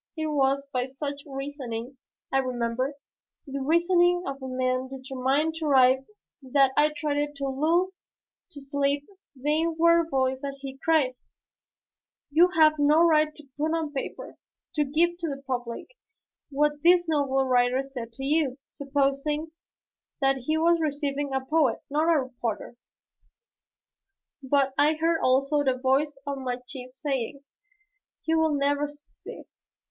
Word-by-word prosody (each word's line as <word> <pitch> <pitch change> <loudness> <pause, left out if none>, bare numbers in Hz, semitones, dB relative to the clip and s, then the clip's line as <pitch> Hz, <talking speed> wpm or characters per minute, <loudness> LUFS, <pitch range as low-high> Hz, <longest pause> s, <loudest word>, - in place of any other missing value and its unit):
It 315 - -2
was 275 -2 +1
by 250 0 0
such 280 +1 -5
reasoning, 270 -3 -6 0.4
I 270 - +4
remember, 255 +1 -2 0.5
the 275 -1 -5
reasoning 350 +4 +3
of 275 0 -5
a 265 - -5
man 255 0 -1
determined 270 +3 -1
to 320 - -3
arrive 265 -1 +4 0.3
that 270 0 +3
I 300 +1 +4
tried 295 0 -1
to 280 -1 -3
lull 325 +7 +1 0.6
to 290 -6 -10
sleep 280 +1 -1 0.3
the 295 +4 0
inward 335 0 +3
voice 265 -2 0
that 275 -1 -5 0.3
cried, 310 -6 +3 1.2
"You 335 +5 +6
have 310 -1 +5
no 300 +3 +5
right 305 -2 +3
to 300 -2 -13
put 310 +3 0
on 315 -3 -3
paper, 270 - -6 0.3
to 300 - +2
give 340 +5 +1
to 335 - -2
the 275 -1 -6
public 245 -3 -4 0.6
what 295 +1 0
this 345 +1 +5
noble 275 -4 +1
writer 250 +1 +2
said 250 -4 -7
to 270 +3 -6
you, 285 -3 +1
supposing 285 +2 -1 0.7
that 270 -1 +2
he 310 +5 -1
was 335 +1 +3
receiving 285 -2 -2
a 265 0 -2
poet, 305 0 +1
not 310 +3 +2
a 320 - +4
reporter." 240 -3 -5 1.7
But 270 0 +1
I 300 +2 +5
heard 325 +1 +1
also 275 +3 +2
the 260 -2 +1
voice 275 +3 +1
of 280 -1 -3
my 250 -2 -3
chief 255 -2 -8
saying, 275 0 -3 0.8
"You 320 0 +2
will 320 -2 +2
never 285 +1 +1
succeed." 290 0 -12
280 Hz, 140 wpm, -26 LUFS, 265-310 Hz, 1.7 s, You